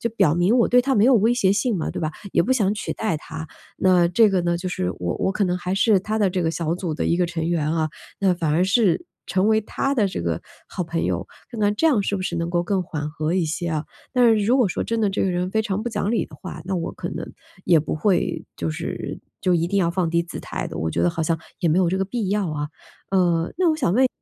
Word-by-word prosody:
就 235 - 0
表 190 -9 +3
明 180 +8 +3
我 235 - +4
对 250 0 +5
她 270 0 +1
没 210 0 +4
有 260 - +6
威 225 +1 +4
胁 195 -6 +3
性 210 +2 +1
嘛， 165 - -2
对 - - -5
吧？ 155 -1 -1 0.2
也 - - +4
不 260 - +1
想 210 -6 +2
取 - - -3
代 215 -7 -1
她。 160 +1 -7 0.3
那 180 -2 +4
这 220 +5 +5
个 190 - +2
呢， 170 0 0
就 185 +1 -4
是 90 - -2
我 85 -1 -2
我 - - +1
可 200 - +1
能 180 0 0
还 180 +2 -2
是 200 0 +4
她 215 +3 -2
的 205 - +3
这 180 -1 -1
个 160 - +1
小 165 0 -1
组 175 -3 -3
的 - - -2
一 170 - +2
个 180 0 +2
成 165 -1 -3
员 155 -3 0
啊， 160 -1 0 0.3
那 195 -2 +3
反 165 -3 -1
而 170 +4 +3
是 200 - +2 0.2
成 190 +3 +1
为 220 0 +4
她 275 +6 -2
的 215 -6 +3
这 180 - -4
个 85 -1 -1 0.3
好 180 - -3
朋 165 0 -2
友， - - -1 0.2
看 230 -3 -6
看 205 0 +2
这 325 - +2
样 270 -9 +4
是 200 - -1
不 185 - -4
是 175 -2 -2
能 170 0 -1
够 175 0 +1
更 190 +1 0
缓 150 -3 -4
和 155 +3 -2
一 180 -3 +2
些 165 +3 -3
啊？ 155 -1 -2 0.3
但 250 -2 +4
是 205 - 0
如 245 +5 +3
果 240 -7 +3
说 - - -2
真 230 0 -1
的 210 -2 +2
这 195 - -2
个 - - +1
人 180 +1 -1
非 220 +2 +1
常 210 0 -2
不 240 - -2
讲 210 -2 -1
理 230 - +1
的 - - -14
话， 185 -4 -8
那 190 +1 -2
我 170 - -3
可 - - -6
能 - - -5 0.4
也 170 - +5
不 155 - -3
会 185 +2 0
就 80 - -2
是 - - -5 0.2
就 185 - +2
一 170 0 +1
定 200 +3 0
要 170 - +2
放 175 -1 0
低 170 0 +2
姿 170 - -8
态 - - -4
的， - - -7
我 80 - -1
觉 - - -1
得 175 - +3
好 165 -1 -3
像 165 0 +1 0.2
也 170 - +1
没 155 - +3
有 185 -2 +3
这 190 +2 0
个 195 - +1
必 215 0 -3
要 200 -2 0
啊。 150 -1 -3 0.4
呃， 175 -3 +2
那 360 -2 +4
我 - - +2
想 175 - +1
问 260 +5 +4
一 - - +4
185 Hz, 310 characters per minute, -23 LUFS, 170-210 Hz, 0.4 s, 有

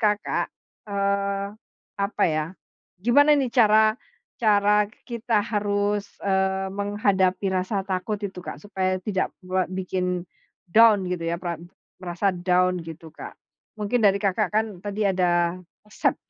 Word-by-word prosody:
Kakak, 210 -1 0 0.4
eee, 200 0 0 0.5
apa 200 +1 -1
ya, 155 -2 0 0.5
gimana 255 +9 +4
nih 265 -3 0
cara 215 -2 +5 0.5
cara 210 -1 +4
k - - -22
kita 235 -2 0
harus, 205 -1 0 0.2
eee, 190 0 +1
menghadapi 200 -2 +1
rasa 190 +1 -1
takut 195 +2 -2
itu, 185 -2 -9
Kak, - - -7
supaya 185 -2 -1
tidak 190 0 -2 0.2
buat 185 0 0
bikin 185 -1 -2 0.4
down, 210 0 +5
gitu 180 -1 -3
ya, 170 - -1
perap 170 -2 -5 0.4
merasa 185 +2 0
down, 180 0 +1
gitu, 165 -1 -10
Kak? - - -9 0.4
Mungkin 210 +4 0
dari 200 -1 +5
Kakak 200 +1 0
kan 220 +1 +3 0.2
tadi 205 0 -1
ada 175 -2 +2 0.3
resep 210 - 0
200 Hz, 135 wpm, -24 LUFS, 185-210 Hz, 0.5 s, cara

